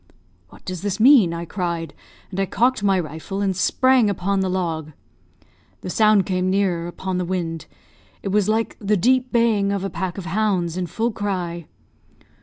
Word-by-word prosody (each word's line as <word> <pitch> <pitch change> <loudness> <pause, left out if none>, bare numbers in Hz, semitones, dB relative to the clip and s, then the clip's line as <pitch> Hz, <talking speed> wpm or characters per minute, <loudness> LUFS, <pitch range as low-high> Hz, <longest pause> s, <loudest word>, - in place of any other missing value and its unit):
'What - - -18
does 185 -2 -5
this 205 +1 -2
mean?' 235 -7 +6
I 170 0 -4
cried, 170 -2 -3 0.4
and 190 - -4
I 195 - +1
cocked 250 +3 +1
my 195 -2 +2
rifle 160 +4 -5
and 195 -2 0
sprang 255 +4 +3
upon 195 0 -1
the 190 -1 0
log. 165 -4 -3 0.9
The 180 - -5
sound 215 -2 +4
came 185 -1 0
nearer 185 -3 0
upon 185 +1 -4
the - - 0
wind. 170 -3 -3 0.6
It 195 - -2
was 205 +1 +2
like 225 +1 0
the 210 0 +1
deep 255 +6 +2
baying 220 -4 +2
of 200 -1 -2
a 195 - -3
pack 180 +2 -4
of 190 - -6
hounds 185 -2 0
in 180 -1 -2
full 225 +8 -1
cry. 180 -5 -4
190 Hz, 180 wpm, -22 LUFS, 175-210 Hz, 0.9 s, mean